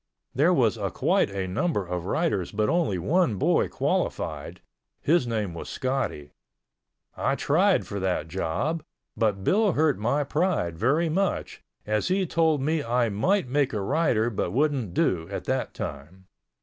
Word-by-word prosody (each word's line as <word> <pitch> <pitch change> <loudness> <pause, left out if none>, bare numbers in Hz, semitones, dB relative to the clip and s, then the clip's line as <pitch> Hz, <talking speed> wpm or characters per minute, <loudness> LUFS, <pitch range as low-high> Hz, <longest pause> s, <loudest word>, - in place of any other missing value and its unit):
There - - +3
was - - +2
a - - -2
quite - - +1
a 95 -1 -3
number 105 - -1
of 90 -1 -4
riders 100 -3 0
but 105 0 0
only 165 - +1
one 150 - +1
boy 95 - +2
qualified—his 160 -4 -2
name 105 -6 -2
was 85 - -7
Scotty. 130 - -2 0.8
I - - 0
tried - - +2
for 100 - -5
that 95 -4 -1
job, 95 - -2 0.3
but 105 -4 0
Bill 205 - +3
hurt 150 -4 +2
my 120 +7 +1
pride 150 - 0
very 140 - +1
much, 190 +4 -1 0.2
as 105 0 0
he 190 +1 +1
told 160 -4 +1
me 155 +1 0
I 120 -1 +1
might 175 - +1
make 140 0 +1
a 105 - -1
rider 120 -2 +1
but 100 - -1
wouldn't 130 - 0
do 85 -1 +1
at 100 - -5
that 130 0 -2
time. 85 +7 -7
120 Hz, 155 wpm, -26 LUFS, 95-155 Hz, 0.8 s, There